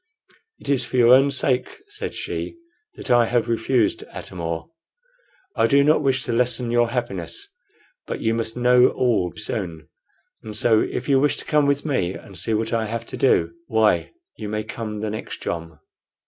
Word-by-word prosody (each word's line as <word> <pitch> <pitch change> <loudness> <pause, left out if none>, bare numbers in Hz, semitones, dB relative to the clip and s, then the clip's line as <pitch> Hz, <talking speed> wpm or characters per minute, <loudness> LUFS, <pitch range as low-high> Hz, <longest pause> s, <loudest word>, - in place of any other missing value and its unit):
"It - - -13
is 135 -2 +1
for 125 - -4
your 120 0 +7
own 135 +2 +6
sake," 130 -1 0
said 415 +1 -6
she, 345 - -4 0.4
"that - - -5
I 120 -1 +5
have 120 -1 +1
refused, 115 0 +1
Atam 90 - -8
or. 85 - -4 0.8
I - - +3
do 140 0 +4
not 150 +1 +4
wish 135 -2 +1
to 120 - -2
lessen 125 0 +1
your 120 -1 +3
happiness. 125 - -3 0.6
But - - -4
you 115 - +1
must 115 0 -2
know 125 +1 +5
all 110 -8 +1
soon; 80 -3 -4 0.5
and 110 -1 -5
so, 110 -1 +4
if - - -3
you 135 -2 +4
wish 145 +2 +2
to - - -8
come 150 -2 +2
with 140 +1 +1
me 95 - 0
and 100 - -12
see 110 +5 -1
what 110 +1 -2
I 110 -1 0
have 115 +1 -4
to - - -7
do, 135 - +2
why, - - +2 0.3
you 105 - -5
may 105 0 -2
come 105 -2 -6
the 110 -1 -2
next 110 - -6
jom." 80 -2 -4
120 Hz, 190 wpm, -22 LUFS, 110-130 Hz, 0.8 s, your